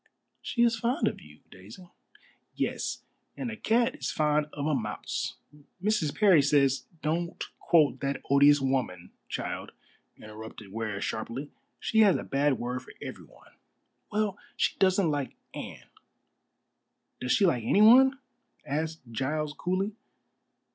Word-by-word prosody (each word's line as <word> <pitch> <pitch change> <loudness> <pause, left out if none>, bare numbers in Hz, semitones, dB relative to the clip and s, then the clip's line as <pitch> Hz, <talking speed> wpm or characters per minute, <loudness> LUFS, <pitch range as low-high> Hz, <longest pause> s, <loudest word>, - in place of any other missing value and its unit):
"She 235 - 0
is 235 -1 +4
fond 245 +7 +1
of - - -3
you, - - -16
Daisy." 185 -2 -13 0.7
"Yes. - - -2 0.3
And 245 - -3
a - - -5
cat 235 +3 +2
is - - -4
fond 150 -1 +1
of 145 -1 -4
a 155 - +1
mouse. 110 -6 -3 0.4
Mrs. 195 -6 0
Parry 190 -8 +6
says 140 -1 +2
" 165 - -29
"Don't 170 +3 -1 0.2
quote 150 -7 +3
that 140 -1 -2
odious 145 +1 +6
woman, 130 -10 -2 0.2
child," - - -4 0.4
interrupted 110 -1 -10
Ware 110 -2 -3
sharply. 120 +8 -4 0.3
"She 220 - +1
has 205 -4 +6
a - - -2
bad 140 -1 +1
word 125 +1 -3
for - - -14
everyone." - - -11 0.6
"Well, 210 -2 -1 0.2
she - - +1
doesn't 185 -3 +3
like 145 -3 -3 0.2
Anne." - - -8 1.3
"Does 125 - -2
she 205 - +4
like 125 -10 +2
anyone?" 245 - +6 0.5
asked 160 +3 -3
Giles 150 +5 -2
coolly. 185 +5 -1
150 Hz, 135 wpm, -28 LUFS, 135-200 Hz, 1.3 s, Parry